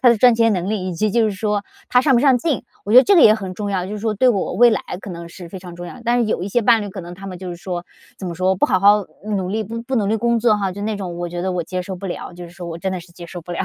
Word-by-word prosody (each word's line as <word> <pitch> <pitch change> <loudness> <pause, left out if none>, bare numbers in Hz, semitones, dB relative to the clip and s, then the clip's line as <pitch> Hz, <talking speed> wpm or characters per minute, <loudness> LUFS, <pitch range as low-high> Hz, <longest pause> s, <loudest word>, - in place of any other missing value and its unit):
他 255 - +6
的 235 - +5
赚 245 +2 +6
钱 230 0 +3
能 185 +2 -2
力， 190 -4 -2
以 180 - -4
及 215 +5 0
就 230 +2 +3
是 - - -2
说 210 0 -1 0.3
他 250 - +5
上 265 0 +3
不 235 - +4
上 270 -3 +5
进， 280 -1 -1 0.2
我 210 - -2
觉 250 - +10
得 260 - +7
这 400 - +5
个 335 - +7
也 215 - +8
很 195 -4 -5
重 205 +1 -4
要， 185 -2 -1
就 195 - -6
是 210 - -4
说 215 0 -1
对 255 +5 +3
我 200 -6 0
未 240 0 +6
来 215 - +1 0.2
可 200 - -7
能 170 -1 -7
是 175 0 -10
非 190 - -8
常 180 -1 -10
重 175 0 -8
要， 250 - -10
但 240 +1 +2
是 240 - +2
有 175 - -1
一 195 - -3
些 240 +4 +1
伴 230 0 +5
侣 205 - -5
可 190 0 -7
能 175 0 -9
他 195 +2 -10
们 185 -2 -6
就 185 0 -7
是 175 - -6
说 175 -1 -5 0.3
怎 190 - -7
么 175 - -4
说 185 +2 +1
不 185 - +1
好 185 - +2
好 205 +1 +5 0.2
努 200 -4 -2
力 215 +3 -2
不 230 +5 -4
努 210 -4 +1
力 220 - +1
工 235 +1 +1
作 220 -2 +3
哈， 195 -2 -1
就 200 - -8
那 215 0 -2
种 180 -4 -5
我 175 0 -3
觉 175 0 -5
得 190 - -1
我 180 -1 -1
接 180 +2 -4
受 190 +1 -6
不 195 +2 -7
了， 180 - -6
就 175 0 -9
是 170 - -11
说 175 0 -9
我 165 0 -6
真 190 +2 -2
的 185 - -3
是 175 +1 -16
接 170 0 -10
受 175 +1 -8
不 175 - -11
了。 170 - -3
195 Hz, 390 characters per minute, -20 LUFS, 180-225 Hz, 0.3 s, 觉